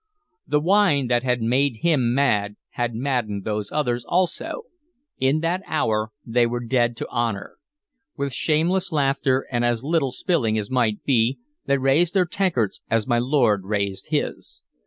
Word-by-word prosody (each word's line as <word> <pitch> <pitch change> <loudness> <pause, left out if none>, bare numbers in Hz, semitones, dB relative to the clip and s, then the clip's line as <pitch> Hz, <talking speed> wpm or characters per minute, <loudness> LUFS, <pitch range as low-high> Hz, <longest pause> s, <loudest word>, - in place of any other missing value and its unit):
The 150 - +2
wine 170 -6 +3
that 120 -1 +3
had 125 -2 0
made 125 0 +1
him 130 -8 +2
mad 105 -7 +1
had 120 -2 -3
maddened 115 -6 -2
those 105 -1 -3
others, 125 -5 -1
also. 185 - -1 0.6
In 135 +4 +2
that 170 +3 0
hour 110 -8 0
they 120 +1 +2
were 120 0 -4
dead 120 -1 +1
to - - -4
honor. 115 -5 -2 0.6
With 140 -2 -2
shameless 170 +8 +1
laughter 135 -3 +1
and 120 -1 0
as 120 0 0
little 155 -2 +1
spilling 125 -7 0
as 105 +1 -4
might 115 -5 +1
be, 125 -1 +2 0.3
they 140 - +3
raised 140 +7 +2
their 185 -2 +4
tankards 170 - -1
as 115 -1 +1
my 120 -2 +1
lord 120 -7 +2
raised 100 -1 -2
his. - - -3
125 Hz, 155 wpm, -23 LUFS, 115-150 Hz, 0.6 s, their